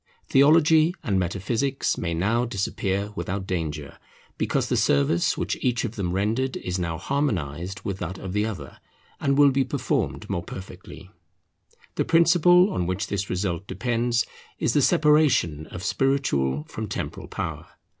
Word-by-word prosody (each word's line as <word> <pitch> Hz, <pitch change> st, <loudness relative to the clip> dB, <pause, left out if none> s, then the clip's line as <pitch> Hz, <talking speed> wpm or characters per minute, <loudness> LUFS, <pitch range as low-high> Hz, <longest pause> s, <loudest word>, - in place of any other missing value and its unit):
Theology 155 Hz, +4 st, +5 dB
and 95 Hz, -2 st, +1 dB
Metaphysics 110 Hz, +10 st, -1 dB
may 85 Hz, -2 st, -2 dB
now 105 Hz, +8 st, +1 dB
disappear 100 Hz, -2 st, -2 dB
without 95 Hz, +1 st, -3 dB
danger, 80 Hz, -6 st, -4 dB, 0.4 s
because -, -, 0 dB
the -, -, 0 dB
service 70 Hz, +5 st, +2 dB
which -, -, -2 dB
each 120 Hz, -1 st, 0 dB
of 115 Hz, 0 st, -5 dB
them 90 Hz, -4 st, -2 dB
rendered 110 Hz, +8 st, 0 dB
is 90 Hz, 0 st, -3 dB
now 85 Hz, -2 st, -2 dB
harmonized 95 Hz, -, -2 dB
with 100 Hz, -1 st, -4 dB
that 90 Hz, +2 st, -4 dB
of 95 Hz, -1 st, -6 dB
the 105 Hz, +1 st, +1 dB
other, 90 Hz, -11 st, -6 dB, 0.4 s
and 140 Hz, -1 st, +1 dB
will 145 Hz, -1 st, +6 dB
be 135 Hz, 0 st, +2 dB
performed -, -, -2 dB
more 85 Hz, -, -2 dB
perfectly. 95 Hz, +1 st, -10 dB, 0.9 s
The -, -, +1 dB
principle 175 Hz, +3 st, +5 dB
on 90 Hz, -, -1 dB
which 95 Hz, +3 st, -1 dB
this 100 Hz, -1 st, -3 dB
result 90 Hz, 0 st, -2 dB
depends 120 Hz, -1 st, 0 dB, 0.3 s
is -, -, 0 dB
the -, -, +3 dB
separation 140 Hz, -, +3 dB
of 90 Hz, -, -8 dB
spiritual 75 Hz, -, +1 dB
from -, -, -6 dB
temporal -, -, -5 dB
power. -, -, -5 dB
100 Hz, 150 wpm, -25 LUFS, 90-135 Hz, 0.9 s, will